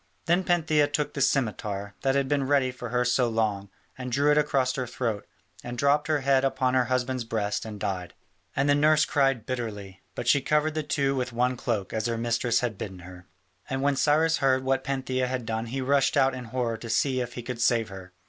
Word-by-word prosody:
Then 175 +3 +2
Pantheia 160 -4 +2
took 150 0 -1
the 140 - -3
scimitar, 105 -6 -1
that 135 0 +1
had 140 -1 +1
been 140 -1 0
ready 135 -2 +2
for 125 -1 -7
her 125 +1 +1
so 125 0 +2
long, 105 -3 -1 0.3
and 125 -1 -6
drew 145 +4 +3
it 150 - +3
across 135 -3 +1
her 130 -2 -3
throat, 115 -4 -3 0.4
and 120 0 -6
dropped 140 +3 +2
her 155 -2 +1
head 135 0 +3
upon 130 -1 +1
her 130 -1 +3
husband's 130 0 -1
breast 110 -2 -2
and 105 -2 -7
died. 90 -3 -4 0.4
And 135 +1 +1
the 145 - +5
nurse 155 +1 +4
cried 135 -6 +1
bitterly, 105 -6 -5
but - - -5
she 140 - +4
covered 150 +2 +1
the 155 - -1
two 140 -3 0
with 125 -1 -2
one 125 +2 +1
cloak 115 -5 -3
as 110 0 -1
her 115 -1 -1
mistress 115 0 +1
had 115 -5 -3
bidden 95 -3 -6
her. 90 0 -12 0.4
And 135 0 -2
when 140 0 +2
Cyrus 155 +4 +3
heard 130 -1 +2
what 130 0 0
Pantheia 130 -1 -1
had 125 -2 -3
done 110 +1 -3
he 130 +3 -3
rushed 140 +2 +2
out 135 -1 +4
in 130 -1 -6
horror 115 -1 -2
to 115 +1 -9
see 130 +2 +1
if 120 -1 -5
he 120 - -6
could 120 -1 -5
save 115 -2 +2
her. 95 -2 -10
130 Hz, 225 wpm, -26 LUFS, 115-140 Hz, 0.4 s, the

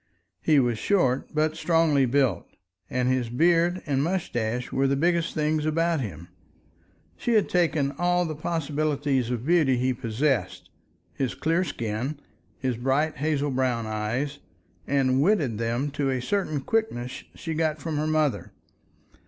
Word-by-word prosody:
He 155 -3 +4
was 120 -4 +1
short 140 -10 +1
but 155 +1 +1
strongly 160 -4 +3
built, 125 -8 +1 0.4
and 125 0 0
his 130 -2 +1
beard 170 +7 +2
and 140 -3 0
mustache 125 -9 -2
were 135 +1 +2
the 140 - +2
biggest 170 +3 +1
things 155 0 +1
about 165 0 +1
him. 85 - -6 0.9
She 240 -2 0
had 215 - +3
taken 160 -6 +1
all 175 0 +2
the 160 - -3
possibility 150 -3 -1
of 120 -1 -3
beauty 155 -6 +3
he 130 +1 +1
possessed, 125 +2 -1 0.4
his 135 -3 -2
clear 165 +3 +1
skin, 120 0 -3 0.4
his 130 -3 -2
bright 135 +6 0
hazel 145 0 0
brown 125 -3 0
eyes, 115 +7 -2 0.5
and 135 -1 +2
wedded 145 - +2
them 120 +5 -1
to 145 -1 -1
a 130 -1 0
certain 155 +1 -1
quickness 130 - -2
she 165 - -5
got 155 -1 0
from 155 0 -3
her 155 +1 0
mother. 150 - 0
140 Hz, 145 wpm, -26 LUFS, 125-160 Hz, 0.9 s, He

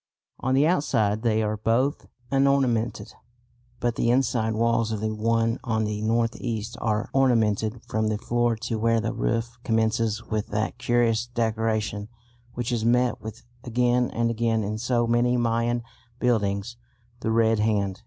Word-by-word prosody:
On 130 +1 0
the 140 +2 +4
outside 115 - +1
they 110 -2 +1
are 105 0 -1
both 115 +7 0 0.2
unornamented, 135 -4 +1 0.7
but 120 -1 -1
the 115 - +1
inside 120 -3 +1
walls 115 0 +1
of 110 - -2
the 110 +1 -2
one 115 +1 +1
on 110 -4 0
the 105 0 -3
north 115 +1 +1
east 115 -1 -3
are 110 -1 -1
ornamented 115 -4 +2
from 110 0 0
the 110 -1 0
floor 120 +1 0
to 110 0 -4
where 115 +1 +2
the 115 +2 -2
roof 115 0 -2
commences 110 0 0
with 110 -1 -2
that 105 +1 -2
curious 120 -1 +1
decoration 110 -3 -1 0.5
which 120 -1 -2
is 115 -2 -1
met 120 0 +2
with 110 0 -8 0.2
again 125 +1 +1
and 115 0 0
again 115 -1 0
in 105 +2 -3
so 120 0 +1
many 120 +1 +2
Mayan 120 0 0 0.4
buildings 110 -1 0 0.4
the - - -2
red 110 -1 +3
hand. 100 -3 0
115 Hz, 155 wpm, -25 LUFS, 110-120 Hz, 0.7 s, the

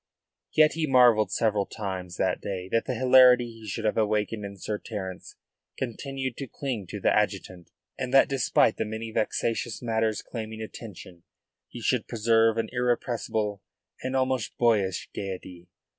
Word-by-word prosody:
Yet 155 -1 +5
he 160 -1 -1
marvelled 120 -6 +5
several 105 -3 +1
times 95 -4 -5
that 95 - 0
day 95 -2 -4
that 115 +2 +1
the 130 - -2
hilarity 125 0 +6
he 115 -1 -12
should 110 +2 -4
have 105 - +1
awakened 105 0 0
in 100 0 -7
Sir 105 +2 -4
Terence 95 -4 -7 0.4
continued 130 +1 -4
to 135 - -5
cling 120 -8 -4
to - - -6
the - - +2
adjutant, 90 -2 -2 0.3
and 125 -1 -3
that 135 - +6
despite 130 -4 +2
the - - 0
many 110 +1 -5
vexatious 115 +1 -1
matters 110 -2 -1
claiming 110 -2 -6
attention 105 -5 -9 0.5
he - - -9
should - - 0
preserve 115 0 +3
an 115 -1 -1
irrepressible 120 -4 -1 0.4
and 130 +1 -2
almost 130 -3 0
boyish 105 -6 +1
gaiety. 90 -2 -6
110 Hz, 155 wpm, -27 LUFS, 105-125 Hz, 0.5 s, hilarity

